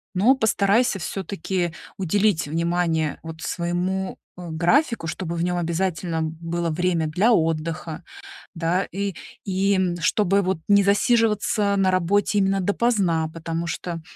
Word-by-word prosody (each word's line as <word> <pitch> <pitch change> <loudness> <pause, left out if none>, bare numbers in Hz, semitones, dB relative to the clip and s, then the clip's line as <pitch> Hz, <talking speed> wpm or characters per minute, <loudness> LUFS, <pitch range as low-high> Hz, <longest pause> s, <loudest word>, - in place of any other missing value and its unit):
но 230 +9 +5
постарайся 220 -1 +2
всё-таки 180 -1 -3 0.2
уделить 195 -2 +1
внимание 165 -1 0
вот 160 0 -8
своему, 180 +2 -2 0.2
э, 175 -2 -8
графику, 180 - +1
чтобы 170 +1 -4
в 170 - -1
нём 180 0 0
обязательно 170 -1 -1
было 165 +2 -3
время 170 0 0
для 190 +10 +2
отдыха, 165 -1 -1 0.5
да, 175 +3 0
и 200 0 -2 0.3
и 190 -2 +1
чтобы 200 +2 +2
вот 190 -2 -1
не 200 0 +6
засиживаться 210 -1 +2
на 190 -1 +3
работе 195 +3 +1
именно 195 0 +2
допоздна, 190 -6 +1
потому 165 +1 -4
что, 165 +1 -4
180 Hz, 125 wpm, -23 LUFS, 165-200 Hz, 0.5 s, не